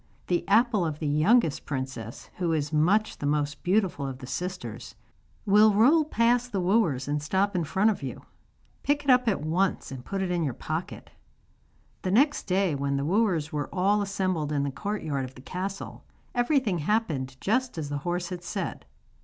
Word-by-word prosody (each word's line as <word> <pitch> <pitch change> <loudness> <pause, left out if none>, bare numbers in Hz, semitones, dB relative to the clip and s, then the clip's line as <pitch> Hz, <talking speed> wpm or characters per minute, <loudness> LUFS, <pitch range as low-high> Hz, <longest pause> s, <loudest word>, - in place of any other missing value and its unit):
The 175 -1 0
apple 220 -1 +4
of 155 -3 -2
the 155 - -5
youngest 155 - +3
princess, 130 -5 -5
who 175 -3 0
is 150 -1 -1
much 190 +8 +2
the 145 - -2
most 145 -1 -1
beautiful 180 -7 +1
of 130 -1 -5
the 130 - -9
sisters, 180 +7 -5 0.5
will 210 +1 +5
roll 290 +9 +5
past 245 -2 +2
the 200 - -1
wooers 180 - +1
and 145 0 -1
stop 190 +6 0
in 175 - +1
front 195 +8 +2
of 205 - -5
you. 130 -4 -6 0.6
Pick 290 +1 0
it 275 - +4
up 250 -1 +4
at 200 -9 +1
once 175 +4 0
and 130 -2 -7
put 195 +7 -3
it 180 - -2
in 175 -2 0
your 135 -6 -2
pocket.' 160 +5 -5 0.9
The 185 - -2
next 275 +10 +2
day, 190 -3 +2
when 140 0 -1
the 140 - -1
wooers 175 -4 +1
were 145 -1 -2
all 200 +3 +2
assembled 185 -6 -1
in 145 -2 0
the 140 - -1
courtyard 160 -6 -3
of 130 0 -8
the 130 - -12
castle, 190 +5 -5 0.3
everything 245 - +1
happened 150 - -1
just 250 +1 0
as 150 -3 -4
the 145 0 -2
horse 175 +3 -2
had 180 -2 -6
said. - - -4
180 Hz, 185 wpm, -27 LUFS, 145-210 Hz, 0.9 s, will